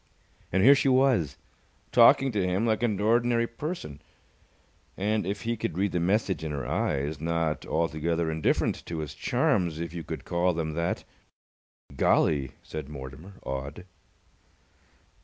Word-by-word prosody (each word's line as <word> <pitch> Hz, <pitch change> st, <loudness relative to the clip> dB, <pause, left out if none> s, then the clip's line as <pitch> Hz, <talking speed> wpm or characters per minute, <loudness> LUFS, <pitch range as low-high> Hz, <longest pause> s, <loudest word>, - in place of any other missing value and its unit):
And 95 Hz, +1 st, +2 dB
here 135 Hz, +5 st, +9 dB
she 140 Hz, 0 st, +2 dB
was, 130 Hz, -, +3 dB, 0.5 s
talking 135 Hz, -1 st, +6 dB
to 105 Hz, -4 st, 0 dB
him 90 Hz, +4 st, 0 dB
like 110 Hz, -1 st, +1 dB
an 110 Hz, -5 st, 0 dB
ordinary 115 Hz, +2 st, +2 dB
person, 115 Hz, -, -6 dB, 1.0 s
and, 105 Hz, 0 st, 0 dB
if 100 Hz, +2 st, -3 dB
he 115 Hz, +1 st, -1 dB
could 105 Hz, -6 st, -4 dB
read 100 Hz, 0 st, +1 dB
the 90 Hz, -, 0 dB
message 95 Hz, 0 st, 0 dB
in 80 Hz, -, -3 dB
her 70 Hz, -3 st, -4 dB
eyes, 75 Hz, -5 st, -1 dB
not 80 Hz, -1 st, -1 dB
altogether 80 Hz, +1 st, 0 dB
indifferent 80 Hz, -1 st, 0 dB
to 85 Hz, -, -4 dB
his 75 Hz, -2 st, -4 dB
charms, 85 Hz, -4 st, 0 dB
if 85 Hz, -1 st, -4 dB
you 85 Hz, -2 st, -5 dB
could -, -, -6 dB
call 90 Hz, +1 st, +1 dB
them 80 Hz, -2 st, -2 dB
that. 85 Hz, +2 st, -2 dB, 0.9 s
"Golly!" 70 Hz, 0 st, +2 dB
said 75 Hz, -2 st, -7 dB
Mortimer, 70 Hz, +6 st, -9 dB
awed. 70 Hz, +5 st, -5 dB
85 Hz, 145 wpm, -27 LUFS, 80-110 Hz, 1.0 s, here